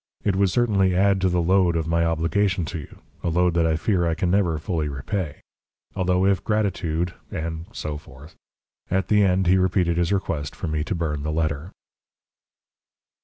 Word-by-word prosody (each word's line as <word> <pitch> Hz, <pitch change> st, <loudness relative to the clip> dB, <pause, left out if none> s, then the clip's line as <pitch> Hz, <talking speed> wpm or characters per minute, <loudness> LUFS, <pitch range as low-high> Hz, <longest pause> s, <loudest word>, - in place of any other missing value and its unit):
It 100 Hz, -3 st, +1 dB
would 100 Hz, 0 st, +3 dB
certainly 100 Hz, -4 st, +2 dB
add 100 Hz, 0 st, +3 dB
to 95 Hz, -, +3 dB
the 90 Hz, -1 st, +1 dB
load 90 Hz, -1 st, +3 dB
of 80 Hz, -1 st, 0 dB
my 85 Hz, 0 st, +2 dB
obligation 85 Hz, +3 st, +1 dB
to 85 Hz, +1 st, -5 dB
you 75 Hz, -, -11 dB, 0.3 s
a -, -, 0 dB
load 90 Hz, +1 st, +2 dB
that 85 Hz, -1 st, +2 dB
I 80 Hz, -, +2 dB
fear 85 Hz, +1 st, +1 dB
I 80 Hz, -, 0 dB
can 90 Hz, +1 st, 0 dB
never 90 Hz, -5 st, +2 dB
fully 75 Hz, 0 st, -2 dB
repay. 75 Hz, +4 st, -4 dB, 0.5 s
Although 90 Hz, 0 st, +1 dB
if 100 Hz, -1 st, +2 dB
gratitude..." 90 Hz, -5 st, -1 dB, 0.2 s
And 80 Hz, +1 st, -5 dB
so 75 Hz, -9 st, -5 dB
forth. 75 Hz, +1 st, -15 dB, 0.6 s
At 95 Hz, 0 st, 0 dB
the 105 Hz, -1 st, +4 dB
end 95 Hz, 0 st, +2 dB
he 90 Hz, +2 st, +4 dB
repeated 90 Hz, -2 st, +1 dB
his 85 Hz, 0 st, +1 dB
request 85 Hz, -8 st, -2 dB
for -, -, -5 dB
me 75 Hz, -1 st, -1 dB
to 95 Hz, -, -2 dB
burn 75 Hz, -4 st, -2 dB
the 75 Hz, +1 st, -2 dB
letter. 75 Hz, 0 st, -1 dB
85 Hz, 185 wpm, -24 LUFS, 80-95 Hz, 0.6 s, the